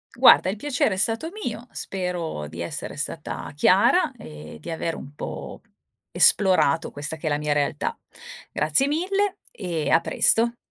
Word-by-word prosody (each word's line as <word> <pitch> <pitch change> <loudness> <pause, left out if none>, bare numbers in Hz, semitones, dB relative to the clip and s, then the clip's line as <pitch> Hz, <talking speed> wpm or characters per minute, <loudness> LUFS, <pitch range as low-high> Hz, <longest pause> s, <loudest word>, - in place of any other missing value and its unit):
Guarda, 185 - +7
il 195 - -2
piacere 250 -2 0
è - - -7
stato 225 +10 +1
mio, 235 +1 -5
spero 175 - -4
di 85 +2 -8
essere 85 - -5
stata - - -5
chiara - - +4
e 75 0 -10
di - - -7
avere 165 0 -3
un 140 - -10
po' - - -7 0.5
esplorato 185 -6 +3
questa 145 +2 -4
che 160 - -5
è - - +2
la 145 - +1
mia 150 0 -1
realtà. 145 0 -1 0.5
Grazie 155 - +2
mille 390 +6 0
e 165 -6 -3
a 165 - +5
presto. 235 +6 +3
165 Hz, 155 wpm, -24 LUFS, 145-225 Hz, 0.5 s, Guarda